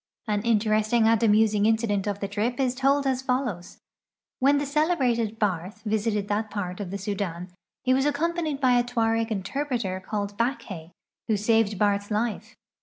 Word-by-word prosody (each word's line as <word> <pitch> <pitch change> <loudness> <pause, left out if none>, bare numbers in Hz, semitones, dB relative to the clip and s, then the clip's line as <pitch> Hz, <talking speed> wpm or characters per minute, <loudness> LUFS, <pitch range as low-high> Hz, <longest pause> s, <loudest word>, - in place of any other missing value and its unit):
An 210 -1 0
interesting 220 0 +2
and 225 -1 +3
amusing 215 -1 +4
incident 220 -3 +1
of 205 0 -3
the 200 - -1
trip 220 +6 -2
is 255 -2 +1
tolil 275 +2 +2
as 260 -1 0
follows: 250 -9 -2 0.6
When 280 +2 +4
the 285 - -1
celebrated 260 -8 +1
Barth 200 0 -2
visited 210 -1 -1
that 210 +1 -1
pait 185 -3 -4
of 200 -3 -4
the 200 - -4
Sudan 190 -3 -4 0.3
he 255 -1 +3
was 265 +2 +2
ac 295 - +1
companied 320 -1 -1
by 250 -3 +4
a - - +2
Tuareg 225 -1 0
interpreter 220 -1 -2
called 200 +1 -4
Backhay, 210 - -3 0.4
who 220 -2 +2
saved 215 -1 +2
Baith's 205 0 +1
life. 215 +1 -2
220 Hz, 170 wpm, -26 LUFS, 205-250 Hz, 0.6 s, amusing